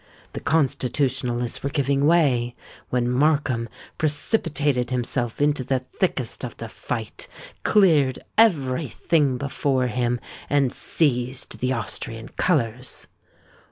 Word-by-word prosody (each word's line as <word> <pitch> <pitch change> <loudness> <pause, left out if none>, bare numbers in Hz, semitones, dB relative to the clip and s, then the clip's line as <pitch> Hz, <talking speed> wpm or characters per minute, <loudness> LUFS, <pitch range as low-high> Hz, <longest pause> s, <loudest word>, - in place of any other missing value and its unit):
The - - -4
Constitutionalists 130 -4 0
were 140 - -1
giving 140 -1 +1
way, 130 -8 +3 0.3
when 125 -1 +1
Markham 130 -3 +1 0.3
precipitated 145 - 0
himself 120 -1 -2
into 145 -2 +2
the 130 0 -1
thickest - - -1
of - - -6
the - - -6
fight, - - -5 0.3
cleared 155 -11 +4 0.2
every 155 - +3
thing 140 0 +1
before 135 -1 0
him, 120 +1 0 0.3
and 140 -3 +2
seized 130 -4 -1
the 130 +1 0
Austrian 115 -1 -5
colours. 125 -7 -1
130 Hz, 110 wpm, -24 LUFS, 125-145 Hz, 0.3 s, cleared